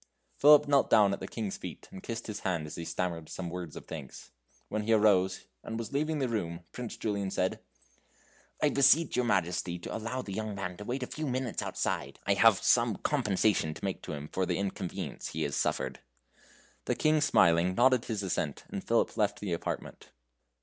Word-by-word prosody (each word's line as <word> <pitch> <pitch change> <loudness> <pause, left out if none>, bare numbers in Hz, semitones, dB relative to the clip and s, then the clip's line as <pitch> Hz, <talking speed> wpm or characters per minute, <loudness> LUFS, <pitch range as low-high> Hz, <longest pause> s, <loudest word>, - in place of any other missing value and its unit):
Philip 150 0 +7
knelt 140 -1 +3
down 105 -3 +5
at - - -3
the - - -6
King's 105 -4 -4
feet - - -8
and 95 - -9
kissed 115 0 -5
his 105 -2 -5
hand 85 -5 -1
as 75 - -8
he 85 - -5
stammered 85 -2 -3
some 90 -2 -5
words 85 -3 -6
of - - -9
thanks. 75 -5 -9 0.4
When 110 - -2
he 115 +2 +1
arose, 95 -4 +3 0.2
and 115 - -5
was 115 +1 -5
leaving 155 +2 0
the 135 -3 0
room, 85 -7 -3
Prince 125 -2 -6
Julian 100 -3 -2
said: 95 0 -1 1.0
"I 150 - +5
beseech 145 +4 +4
your 125 0 +2
Majesty 90 -4 0
to 85 - -6
allow 115 +4 -3
the 100 - -6
young 110 0 -3
man 90 -2 -4
to 105 - -8
wait 130 +3 -2
a - - -1
few 155 +4 -5
minutes 130 -2 -2
outside. - - -2
I - - +3
have - - +5
some - - +4
compensation 95 -5 +1
to - - -6
make 95 - -3
to - - -6
him 75 0 -6
for 95 -1 0
the - - 0
inconvenience 95 -2 -4
he 80 - -3
has 70 -2 -2
suffered." - - -1 0.9
The - - 0
King, 155 0 +3
smiling, 85 - +4
nodded 125 +1 +4
his 110 -3 -3
assent, 80 -6 -2
and - - -5
Philip - - +1
left - - +1
the 100 -4 -3
apartment. 85 - -5
100 Hz, 200 wpm, -30 LUFS, 90-120 Hz, 1.0 s, Philip